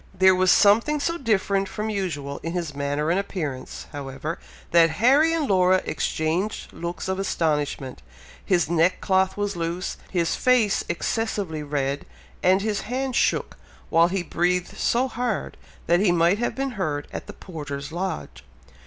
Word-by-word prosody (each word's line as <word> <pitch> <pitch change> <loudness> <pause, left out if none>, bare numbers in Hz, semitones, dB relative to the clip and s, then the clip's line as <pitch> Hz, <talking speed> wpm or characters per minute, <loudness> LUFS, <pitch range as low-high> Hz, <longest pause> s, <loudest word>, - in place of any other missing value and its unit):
There 190 0 +6
was 185 0 +2
something 230 +12 +5
so 335 +4 -1
different 200 -5 +1
from 215 +1 -3
usual 145 -9 -3
in 165 - -4
his 170 -5 -3
manner 145 +2 -1
and 180 - +2
appearance, 155 -10 -5
however, 145 +3 -5 0.3
that 165 -1 +6
Harry 265 - +4
and 325 -3 0
Laura 185 -2 +3
exchanged 160 +6 -2
looks 170 +1 -5
of 190 0 -1
astonishment; 150 -8 -1 0.4
his 175 -4 +2
neckcloth 185 +3 +2
was 205 -1 -1
loose 170 +2 -3
his 170 -3 0
face 245 -5 +3
excessively 190 -3 -2
red 140 -1 -2 0.3
and 190 +2 +3
his 210 -2 -1
hand 260 +2 -3
shook, - - +1 0.3
while 165 +1 +5
he 185 0 -2
breathed 180 +1 0
so 250 +3 +1
hard, 245 -4 -3 0.3
that 175 +1 +3
he 195 -2 +3
might 175 +4 +3
have 240 - -1
been 270 0 -2
heard 155 -10 -3
at - - -6
the - - -8
porter's 145 -5 -7
lodge. 170 - -4
180 Hz, 155 wpm, -24 LUFS, 160-205 Hz, 0.4 s, There